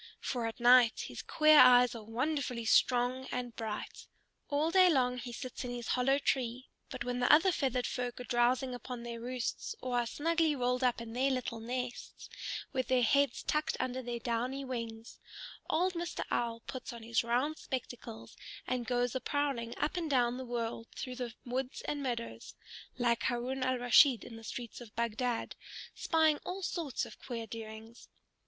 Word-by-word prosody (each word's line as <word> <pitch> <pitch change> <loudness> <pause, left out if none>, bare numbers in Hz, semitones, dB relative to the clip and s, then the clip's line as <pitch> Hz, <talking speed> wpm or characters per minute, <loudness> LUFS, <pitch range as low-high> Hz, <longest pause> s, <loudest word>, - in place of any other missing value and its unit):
For 240 -3 -2
at 225 - -6
night 240 -1 +6
his - - -6
queer 310 -1 +6
eyes 250 -1 +8
are 230 -2 -7
wonderfully 250 +1 -2
strong 250 +3 +3
and 245 -2 -4
bright. 220 -2 -5 0.4
All 295 +3 +1
day 370 0 +7
long 250 -5 +2
he 245 0 -6
sits 255 +1 -6
in 250 - -4
his 240 -1 -6
hollow 265 +2 +3
tree, 255 -3 -1 0.2
but 255 -4 -5
when 245 0 -2
the 245 - +4
other 325 +6 +6
feathered 260 -6 0
folk 245 -2 -3
are - - -5
drowsing 245 +2 +1
upon 245 -1 -6
their 235 -1 -6
roosts, 250 - -3
or 245 -1 0
are 240 - -1
snugly 325 +3 +1
rolled 250 0 0
up 245 -2 +2
in 225 -1 -7
their 260 +3 +2
little 250 -3 -2
nests, 245 +2 -5 0.4
with 260 -2 -1
their 255 -1 +3
heads 280 +2 +2
tucked 305 +1 0
under 255 0 -2
their 240 -1 -4
downy 245 +4 -2
wings, 230 -3 -6 0.5
old 365 +3 +2
Mr. 340 -1 -3
Owl 230 -1 -1
puts 260 0 -6
on 235 -1 -9
his 230 0 +1
round 255 +7 0
spectacles 220 - -6 0.3
and 250 -2 -2
goes 245 -1 +1
a 260 - -2
prowling 275 -5 -1
up 310 - -1
and 330 -3 -2
down 245 -3 +2
the 260 - -5
world 230 -1 -3
through 250 -1 -5
the 245 -3 -4
woods 255 +2 -3
and 290 -1 -3
meadows 240 -3 -4 0.4
(like 235 -2 +2
Haroun 255 +2 -1
al 255 0 +1
Rashid 245 -1 +5
in 230 - -9
the 225 - -11
streets 235 +2 -7
of 230 -3 -12
Bagdad), 235 +1 -1 0.4
spying 315 -2 +2
all 375 +1 -5
sorts 325 -7 -2
of - - -12
queer 235 -3 -5
doings. 225 +1 -9
250 Hz, 180 wpm, -32 LUFS, 235-265 Hz, 0.5 s, eyes